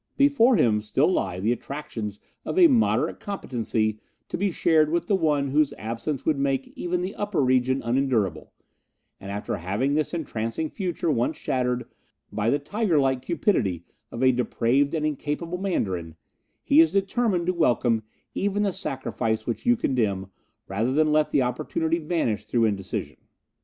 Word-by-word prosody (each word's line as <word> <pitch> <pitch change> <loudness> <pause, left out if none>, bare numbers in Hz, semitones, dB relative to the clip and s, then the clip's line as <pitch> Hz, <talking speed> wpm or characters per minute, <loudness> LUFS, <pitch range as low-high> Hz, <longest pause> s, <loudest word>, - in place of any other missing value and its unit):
Before 275 -3 +5
him 110 - +3
still 110 - +2
lie 95 - -1
the 105 +5 +1
attractions 115 -5 -5 0.2
of - - -4
a 365 - +8
moderate 255 -8 +2
competency 115 - -2 0.3
to - - -3
be 200 +1 0
shared 160 -3 +3
with 170 +2 0
the 210 - 0
one 150 -6 +1
whose 150 +1 +2
absence 120 +6 -4
would 155 -3 +1
make 135 -1 -1
even 180 0 -2
the 190 +3 -3
Upper 205 -3 -2
Region 130 0 +2
unendurable, 115 - 0 0.7
and 95 - -9
after 100 +1 -3
having 100 - -1
this 155 0 0
entrancing 145 -2 -3
future 175 -4 -2
once 120 -3 0
shattered 125 -1 -1 0.5
by 110 +1 0
the 140 - +3
tiger 180 +4 0
like 135 -2 +2
cupidity 125 - 0 0.3
of 115 - -3
a 130 - +6
depraved 125 +3 +1
and 155 -1 -1
incapable 155 +4 -3
Mandarin, 95 - -2 0.5
he 150 - +6
is 165 -1 +4
determined 195 -1 +1
to 185 - +1
welcome 120 -8 +2 0.3
even 205 +1 0
the 200 -2 0
sacrifice 115 -7 -2
which 120 - -4
you 240 0 +5
condemn 100 - -1 0.4
rather 110 +6 -1
than 155 +2 +3
let 150 0 +3
the 140 - +2
opportunity 160 +6 -1
vanish 155 -9 -1
through 115 -2 +2
indecision." 100 -4 -3
140 Hz, 160 wpm, -25 LUFS, 115-170 Hz, 0.7 s, a